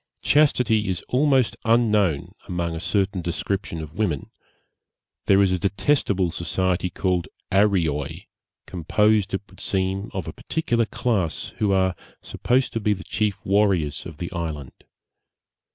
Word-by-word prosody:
Chastity 125 -7 +3
is 90 -3 -2
almost 130 -5 +3
unknown 105 -9 +2 0.2
among 85 -2 -2
a 80 - -4
certain 95 +1 0
description 85 0 -3
of 80 +6 -11
women: 85 -10 -1 1.0
there 100 0 +6
is 95 - +2
a 95 - 0
detestable 100 - +1
society 90 +2 -1
called 90 -2 -1 0.2
Arreoy, 90 -8 +1 0.4
composed, 105 +4 +1
it 95 - -4
would - - -18
seem, 95 +2 -1
of 95 -4 -4
a 80 - -5
particular 120 -8 -1
class, 100 -11 -1
who 105 -2 +2
are 95 -1 +2 0.2
supposed 130 +2 0
to 115 - -1
be 105 -1 +2
the 95 -1 -7
chief 105 -3 -2
warriors 95 -7 +1
of 80 -4 -10
the 85 +3 -5
island. 80 -6 -4
95 Hz, 135 wpm, -23 LUFS, 85-105 Hz, 1.0 s, there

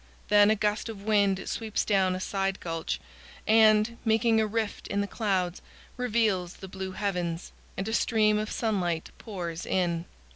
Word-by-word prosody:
Then 205 0 +6
a 220 - +4
gust 210 +2 -1
of 205 -3 -8
wind 200 -3 +2
sweeps 220 -2 -2
down 190 -3 +2
a - - -4
side 195 0 -1
gulch 165 -1 -3 0.5
and, 220 +1 +5
making 225 0 +3
a 215 - +1
rift 220 0 -3
in 200 - -1
the 200 - +1
clouds, 190 -4 -1 0.3
reveals 215 -7 0
the 190 - -9
blue 190 0 -6
heavens, 180 -4 -2 0.3
and 195 - -2
a 220 - -2
stream 215 -2 +3
of 215 +1 -3
sunlight 180 -8 -1
pours 175 -5 -5
in. 170 -2 0
205 Hz, 160 wpm, -28 LUFS, 185-220 Hz, 0.5 s, Then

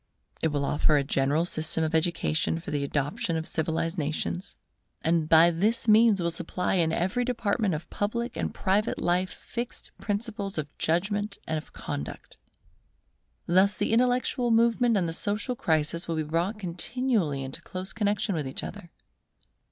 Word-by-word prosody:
It - - +3
will 145 -2 -1
offer 150 +1 +3
a 140 - +2
general 140 +4 +1
system 160 -1 0
of 160 0 -1
education 165 -1 +1
for 175 +2 -7
the 145 -1 0
adoption 155 - -1
of 160 - -2
all - - -4
civilized 165 +2 -1
nations, 155 +5 -3 0.5
and 160 -1 +1
by 165 +1 +7
this 210 +8 +1
means 215 -1 +6
will 170 -1 0
supply 175 +2 -2
in 170 -4 +2
every 185 +9 0
department 225 -6 0
of 155 - -6
public 235 +4 -2
and - - -2
private 205 +3 0
life 180 +1 +1
fixed 240 +1 -6
principles 205 -2 -3
of 145 -1 -4
judgment 200 +5 0
and 160 -1 -1
of - - -14
conduct. 70 - -6 1.1
Thus 190 +4 +3
the - - 0
intellectual 245 0 +2
movement 230 0 +3
and 180 -3 +1
the 165 - -3
social 210 +8 -1
crisis 160 -3 0
will 165 - -1
be 155 - 0
brought 170 +7 -1
continually 185 - -1
into 130 0 -7
close 185 +1 -5
connexion 205 -2 0
with 150 -5 -2
each 130 - -4
other. 205 -4 -8
175 Hz, 165 wpm, -27 LUFS, 160-210 Hz, 1.1 s, by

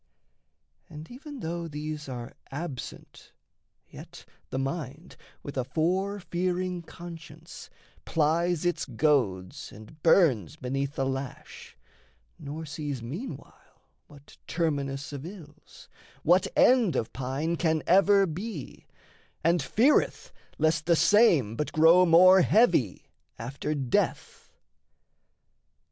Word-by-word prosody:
And 155 +3 -10
even 280 +1 -10
though 170 +1 -4
these 150 -1 -6
are 120 -2 -7 0.2
absent, 145 -3 -8 0.5
yet - - -12 0.2
the - - -4
mind, 140 +3 -5 0.3
With 140 - -7
a 130 - +1
fore 185 +9 -1
fearing 180 0 -2
conscience, 165 -1 -11 0.3
plies 165 +2 0
its 175 - 0
goads 115 -9 0
And 110 +9 -14
burns 155 - +3
beneath 135 +1 -3
the 135 - -1
lash, 135 0 -6 0.6
nor 150 +3 -7
sees 145 -4 -5
meanwhile 165 - -9 0.2
What 145 -1 -17
terminus 140 -4 -2
of 140 -1 -6
ills, 165 -4 -13 0.4
what 180 +3 +4
end 245 -9 +4
of 110 - -2
pine 135 +6 -2
Can 160 -2 0
ever 195 +2 +5
be, 180 - -7 0.6
and 170 +1 +3
feareth 235 - +2 0.3
lest 155 0 +1
the 170 - +5
same 165 - +4
But 150 - -3
grow 165 +3 +6
more 185 +3 +7
heavy 175 - +2 0.3
after 135 +6 -4
death. 135 -4 -2
155 Hz, 110 wpm, -27 LUFS, 140-175 Hz, 0.6 s, more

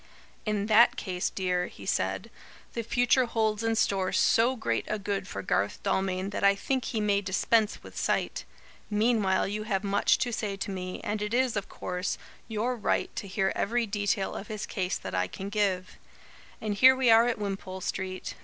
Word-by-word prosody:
"In 210 -1 0
that 220 +2 +6
case, 180 -2 -2
dear," 180 -2 -1
he - - -12
said, - - -1 0.4
"the 235 - -2
future 245 +3 +3
holds 220 -2 0
in 225 0 +1
store 195 -3 +1
so 240 +3 +3
great 225 - -1
a 215 - -1
good 200 -1 -3
for - - -5
Garth 100 - 0
Dalmain 190 0 0
that 205 - -3
I 200 0 +6
think 260 +5 -1
he 225 - -2
may 205 -1 +2
dispense 205 +3 +1
with - - -12
sight. - - -1 0.5
Meanwhile 210 -3 +2
you 210 +1 -3
have 195 -2 -1
much 200 0 +3
to 245 -2 -1
say 205 -2 -2
to 200 - -4
me, 185 -1 -5
and 210 0 -2
it 210 +3 -1
is, 255 -1 +2
of 200 - -3
course, 180 +1 -3 0.3
your 225 +3 -1
right 220 - -1
to 230 -4 -4
hear 190 0 0
every 235 +3 0
detail 205 -2 -1
of 205 - -6
his 215 -1 -4
case 185 -2 -2
that - - -7
I 90 0 +1
can 195 - -6
give. 195 -3 -1 0.6
And 215 -1 -2
here 260 +6 +7
we 260 -3 +4
are 225 +1 +7
at 240 - 0
Wimpole 195 -2 -4
Street. 185 0 -4
205 Hz, 190 wpm, -28 LUFS, 190-225 Hz, 0.6 s, here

